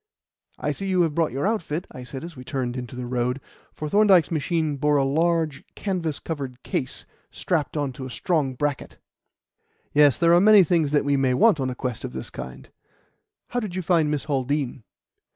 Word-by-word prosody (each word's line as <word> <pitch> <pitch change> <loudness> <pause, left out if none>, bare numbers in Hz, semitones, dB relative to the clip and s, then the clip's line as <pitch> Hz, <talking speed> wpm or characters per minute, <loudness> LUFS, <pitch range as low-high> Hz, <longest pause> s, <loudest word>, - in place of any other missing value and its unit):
"I - - -1
see 195 - -4
you 185 -2 +3
have 160 -3 0
brought 165 0 +1
your 135 +6 -2
outfit," 180 -6 -1
I 125 - -9
said 130 +2 -8
as 170 -1 -8
we 125 - -9
turned 130 -3 -3
into 125 -1 -6
the 125 0 -5
road; 125 +1 -1 0.3
for 155 - -5
Thorndyke's 190 -2 +4
machine 160 -1 0
bore 150 +1 +2
a 140 - +3
large 160 +1 +1
canvas 175 -7 -2
covered 135 -6 -6
case 130 - -3 0.2
strapped 160 -3 -2
on 145 -3 -1
to 130 +1 -7
a - - -9
strong 140 -1 -1
bracket. 145 +1 -3 1.0
"Yes; 145 -2 +5
there 170 0 +4
are 175 - +6
many 210 -1 +8
things 165 -3 +2
that 145 -1 +1
we 140 -1 +2
may 130 -2 +2
want 215 - +4
on 130 -1 -1
a 125 - -4
quest 125 -3 -4
of - - -5
this 65 - -6
kind. 65 - -9 0.8
How 245 - -1
did 210 -6 -5
you 185 - -2
find 165 -3 +2
Miss 150 -2 -1
Haldean?" 135 -2 -1
150 Hz, 200 wpm, -24 LUFS, 130-170 Hz, 1.0 s, many